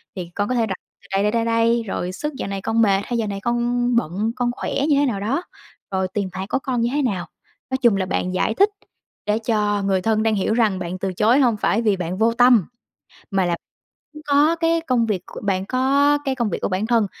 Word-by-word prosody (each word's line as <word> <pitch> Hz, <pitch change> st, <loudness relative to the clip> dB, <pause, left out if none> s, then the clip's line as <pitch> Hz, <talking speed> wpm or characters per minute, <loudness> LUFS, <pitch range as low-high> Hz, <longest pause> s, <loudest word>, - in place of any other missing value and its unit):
thì 180 Hz, -3 st, -6 dB
con 205 Hz, +2 st, -1 dB
có 255 Hz, -, 0 dB
thể 235 Hz, -2 st, +2 dB
đặt 195 Hz, -3 st, -3 dB, 0.3 s
từ 200 Hz, -, -19 dB
đây, 195 Hz, +1 st, +1 dB
đây, 210 Hz, -, +2 dB
đây, 230 Hz, 0 st, 0 dB
đây", 230 Hz, 0 st, +2 dB
rồi 180 Hz, -1 st, -3 dB
sức 300 Hz, +11 st, -4 dB
"Dạo -, -, -4 dB
này 195 Hz, -1 st, -4 dB
con 225 Hz, +3 st, +1 dB
mệt" 200 Hz, -3 st, +3 dB
hay 240 Hz, -, -2 dB
"Dạo 225 Hz, -2 st, -1 dB
này 200 Hz, -1 st, -4 dB
con 240 Hz, +1 st, 0 dB
bận, 210 Hz, +1 st, 0 dB
con 245 Hz, -1 st, 0 dB
khỏe 245 Hz, -, -5 dB, 0.2 s
như 290 Hz, -, +4 dB
thế 290 Hz, -, +3 dB
nào 230 Hz, -7 st, -1 dB
đó", 250 Hz, -, -1 dB, 0.5 s
rồi 190 Hz, -1 st, 0 dB
"Tiền 190 Hz, +1 st, -3 dB
bạc 190 Hz, +1 st, -4 dB
của 265 Hz, -, 0 dB
con 250 Hz, -3 st, -1 dB
như 235 Hz, -, +1 dB
thế 295 Hz, -, +1 dB
nào." 195 Hz, -10 st, -1 dB, 0.4 s
Nói 260 Hz, -, 0 dB
chung 240 Hz, -5 st, +3 dB
là 190 Hz, -, 0 dB
bạn 185 Hz, 0 st, -2 dB
giải 185 Hz, -, +1 dB
thích 400 Hz, -, +4 dB, 0.6 s
để 210 Hz, +1 st, +1 dB
cho 210 Hz, -3 st, 0 dB
người 195 Hz, -1 st, +1 dB
thân 220 Hz, +2 st, +1 dB
đang 220 Hz, -1 st, +2 dB
hiểu 200 Hz, +2 st, 0 dB
rằng 220 Hz, -5 st, +2 dB
bạn 180 Hz, 0 st, -4 dB
từ 190 Hz, 0 st, -3 dB
chối 220 Hz, +8 st, +3 dB
hông 240 Hz, -6 st, +3 dB
phải 210 Hz, +2 st, +1 dB
vì 215 Hz, -4 st, +2 dB
bạn 180 Hz, 0 st, -3 dB
vô 225 Hz, +2 st, +3 dB
tâm, 240 Hz, -5 st, +5 dB, 0.7 s
mà 195 Hz, -2 st, +1 dB
là 170 Hz, -1 st, 0 dB, 0.7 s
có 295 Hz, +3 st, +4 dB
cái 330 Hz, 0 st, +1 dB
công 255 Hz, -7 st, +1 dB
việc 200 Hz, -5 st, -1 dB
của -, -, -9 dB
bạn 190 Hz, -2 st, 0 dB
có 275 Hz, +4 st, +3 dB
cái 270 Hz, -, 0 dB
công 235 Hz, -5 st, -1 dB
việc -, -, -2 dB
của -, -, 0 dB
bản 190 Hz, +3 st, -1 dB
thân 230 Hz, -3 st, +2 dB
225 Hz, 250 wpm, -21 LUFS, 195-245 Hz, 0.7 s, tâm